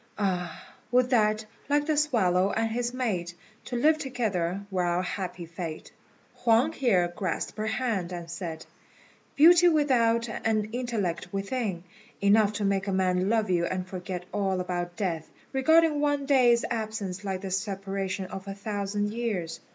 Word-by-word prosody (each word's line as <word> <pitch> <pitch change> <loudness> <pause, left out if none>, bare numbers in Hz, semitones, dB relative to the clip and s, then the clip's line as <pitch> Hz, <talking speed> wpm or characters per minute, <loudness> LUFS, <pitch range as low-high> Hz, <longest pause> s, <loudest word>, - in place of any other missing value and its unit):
Ah, 180 -5 -3 0.2
would 250 0 +3
that, 215 -2 +3 0.2
like 290 0 +2
the 310 0 +1
swallow 200 -11 +2
and 225 0 0
his 240 +1 -1
mate, 195 -9 -2 0.3
To 245 - -5
live 310 +6 +3
together 200 - -1
were 185 -1 0
our 175 +1 +1
happy 180 -2 -4
fate." 165 -1 -7 0.5
Huang 235 +6 +3
here 195 - +2
grasped 185 -4 -3
her 215 - -1
hand 220 -6 -1
and 175 -2 -6
said, 170 -2 -6 0.7
"Beauty 345 +4 +7
without 240 -7 +3
and 215 -1 -1
intellect 205 -9 -2
within 195 -2 -2 0.4
enough 205 +1 +4
to 205 0 -2
make 195 0 0
a - - 0
man 185 0 +1
love 220 -3 +1
you 170 -1 +2
and 185 -1 -3
forget 185 -1 -6
all 195 -2 0
about 175 -1 -3
death, 170 -6 -2 0.2
regarding 310 +2 +4
one 290 -1 +1
day's 250 -4 +4
absence 215 -4 -3
like 190 -2 -3
the 195 -1 -5
separation 195 0 -2
of 190 +1 -8
a 195 - -5
thousand 205 0 -2
years. 200 -9 -3
200 Hz, 155 wpm, -27 LUFS, 185-240 Hz, 0.7 s, Beauty